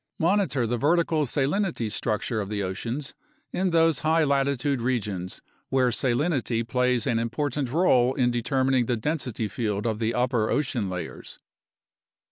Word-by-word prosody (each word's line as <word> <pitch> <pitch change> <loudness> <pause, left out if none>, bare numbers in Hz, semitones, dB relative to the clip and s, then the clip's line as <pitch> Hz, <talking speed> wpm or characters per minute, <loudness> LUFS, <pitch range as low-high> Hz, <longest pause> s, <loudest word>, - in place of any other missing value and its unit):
Monitor 175 - +1
the 120 +1 -1
vertical 160 +1 +2
salinity 145 - 0
structure 110 +1 -1
of 100 - -5
the 105 -1 -2
oceans 120 +10 -4 0.4
in 185 0 +1
those 165 -4 +3
high 160 +1 +2
latitude 140 -2 +1
regions 105 -7 -2 0.3
where 130 -1 +3
salinity 120 -2 0
plays 125 0 +1
an 120 -4 +1
important 130 +3 -2
role 130 -5 +3
in 125 -3 +2
determining 130 +1 +1
the 120 - 0
density 125 -4 -2
field 105 -1 -2
of 110 -2 -1
the 115 0 0
upper 125 -3 +1
ocean 135 -8 0
layers. 90 -3 -6
125 Hz, 140 wpm, -26 LUFS, 115-145 Hz, 0.4 s, those